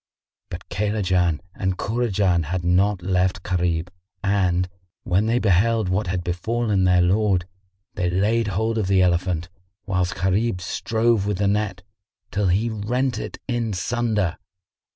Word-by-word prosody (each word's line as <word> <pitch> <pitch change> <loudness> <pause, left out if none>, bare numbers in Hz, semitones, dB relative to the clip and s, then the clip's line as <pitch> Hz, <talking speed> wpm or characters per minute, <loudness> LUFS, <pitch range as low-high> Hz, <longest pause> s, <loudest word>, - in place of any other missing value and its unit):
But - - -8
Kaylajan 95 -5 0
and 95 -1 -2
Kurajan 100 -7 +1
had 90 +3 -2
not 90 +2 +2
left 90 0 0
Gharib 85 -1 0 0.3
and, 90 -3 +1 0.4
when 95 +5 +1
they 115 +2 +2
beheld 110 0 +2
what 95 +2 0
had 90 0 -2
befallen 100 +3 0
their 90 -1 +4
lord, 95 -1 +2 0.5
they 90 -2 -1
laid 105 +5 +1
hold 110 +4 0
of 100 - -1
the 95 -1 +4
elephant, 85 -1 0 0.4
whilst 90 -2 0
Gharib 95 +2 0
strove 110 +3 0
with 105 -2 0
the 100 +1 +1
net, 100 -3 -1 0.5
till 100 -1 0
he 100 +6 +2
rent 120 +4 -1
it - - -6
in 120 -4 -1
sunder. 105 -1 -1
95 Hz, 140 wpm, -23 LUFS, 90-110 Hz, 0.5 s, their